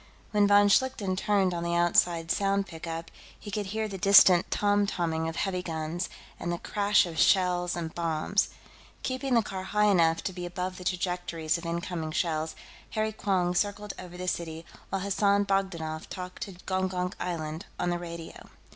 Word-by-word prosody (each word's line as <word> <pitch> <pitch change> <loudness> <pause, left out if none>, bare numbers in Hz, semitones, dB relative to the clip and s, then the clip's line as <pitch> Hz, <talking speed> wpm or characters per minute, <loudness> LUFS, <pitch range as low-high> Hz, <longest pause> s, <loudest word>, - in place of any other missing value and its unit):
When 205 -1 +4
von 205 0 +6
Schlichten 205 -3 +2
turned 195 -1 +2
on 170 - -3
the 170 0 -1
outside 170 -1 +3
sound 200 0 +1
pickup, 165 -1 -6 0.3
he 205 - -8
could 205 0 -2
hear 220 +2 -2
the 195 -2 -6
distant 190 -2 +7
tom 205 0 +2
tomming 160 -3 -1
of 165 - -6
heavy 185 -1 -1
guns, 165 +1 -3 0.3
and 175 - -2
the 175 - -1
crash 205 +2 +2
of 165 -2 -5
shells 180 -2 +3
and 165 -2 -4
bombs. 170 +4 0 0.5
Keeping 260 0 -1
the 230 - +4
car 190 -2 -5
high 210 +3 +1
enough 165 -3 +3
to 190 - -3
be 175 -1 -5
above 180 +1 -4
the - - -8
trajectories 175 -2 -1
of 170 - -7
incoming 170 -2 -3
shells, 160 -2 -1 0.3
Harry 215 0 -1
Quong 190 -4 0
circled 205 +2 -1
over 180 -1 -9
the 185 0 -5
city 165 -2 -3 0.2
while 195 - -2
Hassan 200 +1 +2
Bogdanoff 175 -6 -2
talked 180 0 -7
to 195 - -5
Gongonk 185 -1 -1
Island 160 -1 -4
on 175 - 0
the 175 - -1
radio. 170 -1 -8
180 Hz, 175 wpm, -28 LUFS, 170-200 Hz, 0.5 s, distant